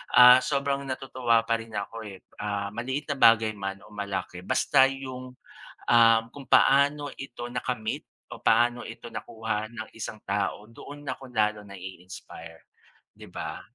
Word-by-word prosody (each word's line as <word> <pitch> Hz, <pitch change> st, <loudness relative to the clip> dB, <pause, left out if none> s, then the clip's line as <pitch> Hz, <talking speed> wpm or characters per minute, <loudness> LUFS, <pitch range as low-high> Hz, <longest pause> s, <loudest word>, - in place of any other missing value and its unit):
ah, 125 Hz, +1 st, +10 dB
sobrang 140 Hz, 0 st, -1 dB
natutuwa 130 Hz, -3 st, +1 dB
pa 115 Hz, 0 st, 0 dB
rin 115 Hz, -1 st, -10 dB
ako, 110 Hz, +2 st, -5 dB
eh, 95 Hz, -2 st, -11 dB, 0.2 s
ah, 100 Hz, -1 st, -3 dB
maliit 130 Hz, +6 st, -3 dB
na 140 Hz, -, -3 dB
bagay 115 Hz, -2 st, +6 dB
man 95 Hz, 0 st, -5 dB
o -, -, -16 dB
malaki 95 Hz, -3 st, -5 dB
basta 130 Hz, -, +4 dB
yung, 130 Hz, -1 st, -7 dB, 0.5 s
ah, 115 Hz, -1 st, +6 dB, 0.2 s
kung 135 Hz, -3 st, -11 dB
paano 145 Hz, +1 st, +4 dB
ito 120 Hz, -2 st, -7 dB
nakamit 120 Hz, -2 st, -3 dB, 0.3 s
o -, -, -16 dB
paano 120 Hz, 0 st, +3 dB
ito 115 Hz, +1 st, -9 dB
nakuha 110 Hz, -2 st, -4 dB
ng 110 Hz, -2 st, -7 dB
isang 110 Hz, -1 st, -6 dB
tao 100 Hz, +1 st, -2 dB
doon 145 Hz, +5 st, -11 dB
ako 130 Hz, -1 st, -6 dB
lalo 105 Hz, -2 st, 0 dB
nai-inspire, 90 Hz, -4 st, -11 dB, 0.5 s
'di -, -, -13 dB
ba? -, -, -6 dB
115 Hz, 150 wpm, -27 LUFS, 105-130 Hz, 0.5 s, ah